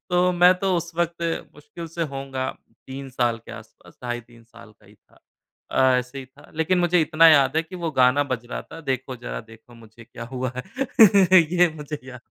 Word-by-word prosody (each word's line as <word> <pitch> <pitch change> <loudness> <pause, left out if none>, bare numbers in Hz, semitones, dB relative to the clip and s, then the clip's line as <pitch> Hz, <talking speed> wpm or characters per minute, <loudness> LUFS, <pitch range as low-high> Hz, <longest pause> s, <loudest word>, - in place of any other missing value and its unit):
तो 180 +1 +3
मैं 180 +1 +5
तो 190 -1 0
उस 170 0 -4
वक़्त 170 0 -2 0.3
मुश्किल 170 +2 -10
से 170 - -2
होऊँगा 135 -1 -4 0.4
3 135 +1 -8
साल 120 -2 0
के - - -9
आसपास - - -14
ढाई 120 -1 -3
3 115 0 -20
साल 115 -1 -16
का 105 - -23
ही 105 - -19
था 105 - -29 0.5
अ, - - +2 0.2
ऐसे 125 +2 -6
ही 130 - -8
था। 135 +3 -20
लेकिन 160 +4 +1
मुझे 175 0 +3
इतना 160 +1 +5
याद 140 -2 +4
है 160 - +2
कि 185 +3 -10
वो 165 - 0
गाना 125 +3 +4
बज 120 -1 -4
रहा - - -4
था 165 - -9
देखो 130 0 -3
ज़रा 120 - -6
देखो 115 +2 -17
मुझे 115 0 -16
क्या 115 0 -10
हुआ 130 -1 -3
है। 195 - +4
ये 175 0 +5
मुझे 150 0 -6
याद 125 -2 -11
140 Hz, 210 wpm, -23 LUFS, 125-175 Hz, 0.5 s, मैं